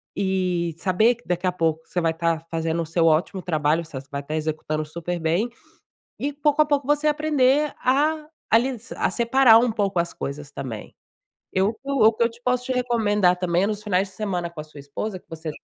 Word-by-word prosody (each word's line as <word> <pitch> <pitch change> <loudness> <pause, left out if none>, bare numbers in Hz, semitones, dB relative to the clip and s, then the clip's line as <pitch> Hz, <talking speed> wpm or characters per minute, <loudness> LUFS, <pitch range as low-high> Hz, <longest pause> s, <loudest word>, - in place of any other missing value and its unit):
e 180 -4 0
saber 210 +7 +3
que 240 - -23
daqui 180 +1 -1
a - - +2
pouco 160 -2 -1
você 180 - -2
vai 165 -1 +1
tá 165 0 0
fazendo 165 0 -1
o - - -3
seu 165 +1 +1
ótimo 165 +4 +2
trabalho, 155 -1 +1
você 155 -4 -8
vai 140 0 -3
tá 150 +2 -4
executando 155 0 -2
super 170 +3 -4
bem, 170 +9 +1 0.7
e 285 +1 -2
pouco 295 +1 +2
a - - 0
pouco 285 -3 0
você 295 +1 +1
aprender 295 -1 +2
a 300 +4 +1 0.2
a - - +6
lis 245 -1 -4
a - - 0
separar 235 -1 +5
um 240 +1 +2
pouco 200 -4 -1
as 170 0 -3
coisas 140 +1 -6
também. 125 -6 -7 0.6
Eu 190 +2 +3
o - - -4
que - - -32
eu 280 - 0
o 220 +1 +7
que 230 - +1
eu - - +1
te 235 +1 -17
posso 250 0 0
te 260 - -1
recomendar 210 -7 +2
também 180 0 +1
é - - +2
nos 210 -1 -3
finais 195 -2 0
de - - -13
semana 180 -5 -2
com 170 -2 -11
a - - -8
sua 155 -1 -14
esposa, 185 +9 -5
que - - -33
você 160 0 -6
190 Hz, 225 wpm, -23 LUFS, 165-240 Hz, 0.7 s, o